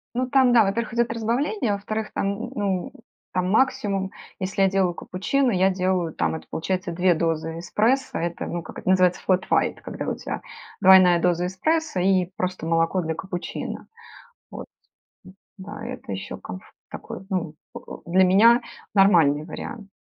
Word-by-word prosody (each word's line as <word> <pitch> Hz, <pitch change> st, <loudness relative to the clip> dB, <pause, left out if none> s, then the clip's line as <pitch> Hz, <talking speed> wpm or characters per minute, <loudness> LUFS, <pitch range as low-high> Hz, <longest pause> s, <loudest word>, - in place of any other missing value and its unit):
Ну, 255 Hz, +1 st, 0 dB
там, 260 Hz, -2 st, +4 dB
да, 230 Hz, -2 st, +6 dB
во-первых, 225 Hz, +4 st, -2 dB
идет 235 Hz, -1 st, +1 dB
разбавление, 235 Hz, -, -1 dB
а, -, -, +1 dB
во-вторых, 215 Hz, +2 st, -4 dB
там, 200 Hz, +5 st, -2 dB
ну, 195 Hz, -4 st, -2 dB, 0.4 s
там, 185 Hz, 0 st, 0 dB
максимум, 200 Hz, -5 st, +1 dB, 0.3 s
если 195 Hz, +1 st, -1 dB
я 195 Hz, -, +5 dB
делаю 190 Hz, -2 st, +1 dB
капучино, 245 Hz, +10 st, -1 dB
я 190 Hz, 0 st, +3 dB
делаю, 185 Hz, -3 st, 0 dB
там, -, -, 0 dB
это 160 Hz, -, -8 dB
получается 185 Hz, +2 st, -2 dB
2 180 Hz, +1 st, +3 dB
дозы 165 Hz, 0 st, -2 dB
эспрессо. 235 Hz, +9 st, 0 dB
Это, 170 Hz, 0 st, -3 dB
ну, 175 Hz, -1 st, -4 dB
как -, -, -9 dB
это -, -, -5 dB
называется, 185 Hz, -1 st, +3 dB
флэт 185 Hz, -1 st, +1 dB
уайт- -, -, +1 dB
когда -, -, -6 dB
у -, -, -1 dB
тя -, -, -6 dB, 0.4 s
двойная 185 Hz, -2 st, +7 dB
доза 175 Hz, 0 st, +1 dB
эспрессо 310 Hz, -, -1 dB
и 185 Hz, 0 st, +3 dB
просто 185 Hz, -3 st, -3 dB
молоко 165 Hz, +2 st, +1 dB
для 160 Hz, -1 st, -2 dB
капучино, 180 Hz, +2 st, -6 dB, 0.6 s
вот. -, -, -8 dB, 0.9 s
Да. 205 Hz, +4 st, -8 dB
Это 250 Hz, -, -7 dB
еще 95 Hz, 0 st, -5 dB
комф 90 Hz, -, -9 dB, 0.3 s
такой, -, -, -8 dB
ну, 170 Hz, -5 st, -2 dB, 0.2 s
поку -, -, -10 dB
Для 185 Hz, +3 st, +4 dB
меня- 225 Hz, +6 st, +6 dB, 0.3 s
нормальный 165 Hz, -7 st, +4 dB
вариант. 200 Hz, +5 st, -8 dB
190 Hz, 160 wpm, -24 LUFS, 175-215 Hz, 0.9 s, двойная